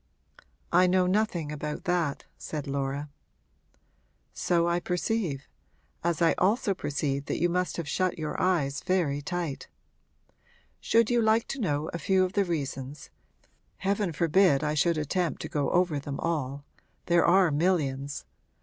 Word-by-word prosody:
'I 180 Hz, +1 st, +5 dB
know 185 Hz, 0 st, +3 dB
nothing 180 Hz, -5 st, 0 dB
about 150 Hz, 0 st, -5 dB
that,' 175 Hz, -5 st, -1 dB
said 150 Hz, -3 st, -5 dB
Laura. 140 Hz, +1 st, -2 dB, 1.3 s
'So 170 Hz, -1 st, +1 dB
I 170 Hz, 0 st, +1 dB
perceive 180 Hz, -5 st, -2 dB, 0.6 s
as 170 Hz, -1 st, +1 dB
I 165 Hz, -, +5 dB
also 200 Hz, +2 st, +2 dB
perceive 140 Hz, -4 st, -2 dB
that -, -, -2 dB
you 175 Hz, +2 st, +2 dB
must 180 Hz, +1 st, -1 dB
have 170 Hz, -3 st, -4 dB
shut 185 Hz, +2 st, 0 dB
your 155 Hz, -2 st, -3 dB
eyes 150 Hz, -7 st, +1 dB
very 170 Hz, -7 st, 0 dB
tight. 170 Hz, -2 st, -4 dB, 1.1 s
Should 230 Hz, 0 st, +2 dB
you 240 Hz, -1 st, +3 dB
like 220 Hz, +1 st, +3 dB
to 275 Hz, -, -4 dB
know 150 Hz, -5 st, 0 dB
a 170 Hz, -, -3 dB
few 190 Hz, +4 st, +3 dB
of 185 Hz, -, -5 dB
the 200 Hz, -1 st, +2 dB
reasons 140 Hz, -, -4 dB, 0.7 s
heaven 195 Hz, -1 st, 0 dB
forbid 165 Hz, -1 st, +3 dB
I 150 Hz, 0 st, 0 dB
should 165 Hz, +2 st, +2 dB
attempt 155 Hz, +1 st, -1 dB
to -, -, -5 dB
go 145 Hz, -2 st, 0 dB
over 175 Hz, -5 st, +2 dB
them 140 Hz, 0 st, -6 dB
all; 140 Hz, -4 st, -2 dB, 0.4 s
there 170 Hz, 0 st, +4 dB
are 180 Hz, -1 st, +5 dB
millions! 145 Hz, -4 st, 0 dB
170 Hz, 150 wpm, -28 LUFS, 145-185 Hz, 1.3 s, I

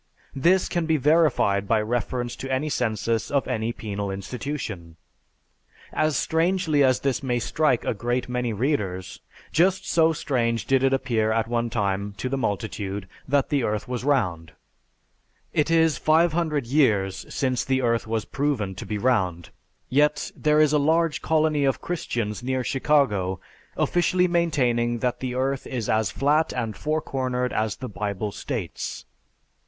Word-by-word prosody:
This 175 Hz, +7 st, +3 dB
can 170 Hz, -3 st, -1 dB
be 160 Hz, -1 st, +3 dB
verified 140 Hz, -, +3 dB
by 110 Hz, +1 st, +3 dB
reference 120 Hz, +2 st, -2 dB
to 135 Hz, -, -5 dB
any 135 Hz, +4 st, 0 dB
census 115 Hz, -3 st, -1 dB
of 140 Hz, -1 st, 0 dB
any 115 Hz, -2 st, -1 dB
penal 100 Hz, -3 st, -4 dB
institution. 95 Hz, -, -5 dB, 1.0 s
As 155 Hz, -3 st, +1 dB
strangely 165 Hz, -3 st, +2 dB
as 130 Hz, -1 st, +3 dB
this 135 Hz, -3 st, 0 dB
may 125 Hz, -3 st, 0 dB
strike 130 Hz, +1 st, +1 dB
a -, -, +1 dB
great 120 Hz, +4 st, -2 dB
many 125 Hz, -1 st, -1 dB
readers, 105 Hz, -6 st, -2 dB, 0.3 s
just 190 Hz, +3 st, +2 dB
so 165 Hz, -1 st, +4 dB
strange 120 Hz, -7 st, -1 dB
did 135 Hz, -1 st, +3 dB
it 135 Hz, -, +4 dB
appear 115 Hz, -5 st, +1 dB
at 110 Hz, 0 st, +1 dB
one 120 Hz, 0 st, -1 dB
time 100 Hz, -2 st, -1 dB
to 130 Hz, -, -3 dB
the 135 Hz, -, -1 dB
multitude 100 Hz, -4 st, -3 dB, 0.2 s
that 140 Hz, 0 st, +2 dB
the 140 Hz, -3 st, +1 dB
earth 105 Hz, -1 st, -2 dB
was 125 Hz, -1 st, -3 dB
round. 90 Hz, -, 0 dB, 1.0 s
(It 150 Hz, +1 st, +1 dB
is 165 Hz, -2 st, +3 dB
500 155 Hz, -3 st, +2 dB
years 110 Hz, -8 st, +2 dB
since 130 Hz, -3 st, 0 dB
the 130 Hz, -1 st, 0 dB
earth 115 Hz, -2 st, +1 dB
was 110 Hz, -1 st, -1 dB
proven 135 Hz, -9 st, -1 dB
to -, -, -7 dB
be 105 Hz, -, -2 dB
round, 95 Hz, -8 st, 0 dB, 0.4 s
yet 150 Hz, +3 st, +2 dB
there 150 Hz, 0 st, +2 dB
is 155 Hz, -1 st, +4 dB
a 150 Hz, -, +4 dB
large 160 Hz, +2 st, +2 dB
colony 155 Hz, -2 st, +2 dB
of 135 Hz, -1 st, +1 dB
Christians 120 Hz, -, -3 dB
near 130 Hz, +1 st, -1 dB
Chicago 120 Hz, -10 st, +1 dB, 0.4 s
officially 180 Hz, +1 st, +2 dB
maintaining 125 Hz, -9 st, +1 dB
that 125 Hz, +1 st, -1 dB
the 125 Hz, -1 st, -3 dB
earth 135 Hz, +1 st, -1 dB
is 120 Hz, -4 st, -3 dB
as 110 Hz, -2 st, +1 dB
flat 150 Hz, +3 st, +1 dB
and 115 Hz, -4 st, -3 dB
four 155 Hz, +1 st, -1 dB
cornered 125 Hz, -1 st, -2 dB
as 110 Hz, -1 st, 0 dB
the 130 Hz, -, -6 dB
Bible 105 Hz, -1 st, -3 dB
states.) 105 Hz, -, -5 dB
125 Hz, 155 wpm, -24 LUFS, 110-150 Hz, 1.0 s, so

